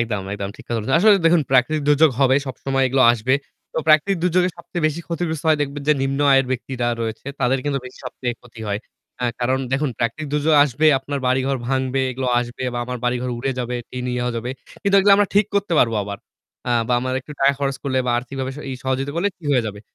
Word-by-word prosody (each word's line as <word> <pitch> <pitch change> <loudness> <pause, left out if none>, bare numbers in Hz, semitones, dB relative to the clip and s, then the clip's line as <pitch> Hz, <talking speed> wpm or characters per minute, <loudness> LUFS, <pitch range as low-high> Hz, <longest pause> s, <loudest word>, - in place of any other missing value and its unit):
একদম, 110 -4 -1
একদম 100 -1 -4
ঠিক - - -13
কথা 120 - -1
বলছেন। 115 +5 -1
আসলে 215 +2 +7
দেখুন 165 -1 +4
প্রাকৃতিক 135 +4 +3
দুর্যোগ 150 +1 +5
হবে 130 -1 +5
সবসময় 135 +1 -1
এগুলো 130 +1 +3
আসবে। 120 +3 +1 0.4
তো - - -2
প্রাকৃতিক 155 +6 +4
দুর্যোগে 180 +1 +2
সবচেয়ে 170 -1 -5
বেশি 155 +2 -2
ক্ষতিগ্রস্ত 165 -2 -3
হয় 155 -1 +4
দেখবেন 145 0 -3
যে - - +7
নিম্ন 135 +1 -1
আয়ের 135 -1 +4
ব্যক্তিরা 125 -1 -2
রয়েছে 115 +2 -4
তাদের 130 +1 +2
কিন্তু 145 -1 0
বেশি 125 - -11
সবচেয়ে 125 -1 -4
ক্ষতি 115 -2 -14
হয়। 100 0 -1 0.4
হ্যাঁ, 120 -1 -1
কারণ 130 +2 +1
দেখুন 140 +1 +1
প্রাকৃতিক 120 +7 -2
দুর্যোগ 150 +1 +2
আসবে, 145 +2 +1
আপনার 140 +2 -4
বাড়িঘর 130 +1 +1
ভাঙবে, 130 0 0
এগুলো 130 +1 -3
আসবে 120 +1 -6
বা - - -2
আমার 125 0 -5
বাড়িঘর 125 +1 -1
উড়ে 135 +2 -1
যাবে, 125 0 -2
টিনও 125 -1 -2
যাবে। 120 +2 -3 0.3
কিন্তু 200 -1 +1
এগুলো 200 +1 +5
আমরা 205 -1 +2
ঠিক 205 0 +4
করতে 200 -3 0
পারবো 115 -2 +3
আবার। 100 0 -6 0.5
আ - - 0 0.2
বা - - +1
আমার 130 +1 -2
একটু 150 - -11
টাকা 140 +1 +5
খরচ 140 -1 -1
করলে 130 -2 0
বা - - +1
আর্থিকভাবে 130 +2 -5 0.2
ই - - -3
সহযোগিতা 135 +2 -1
করলে 185 +4 +1
ঠিক 160 - -10
হয়ে 125 -3 +2
যাবে। 105 -1 -6
135 Hz, 215 wpm, -21 LUFS, 125-150 Hz, 0.5 s, আসলে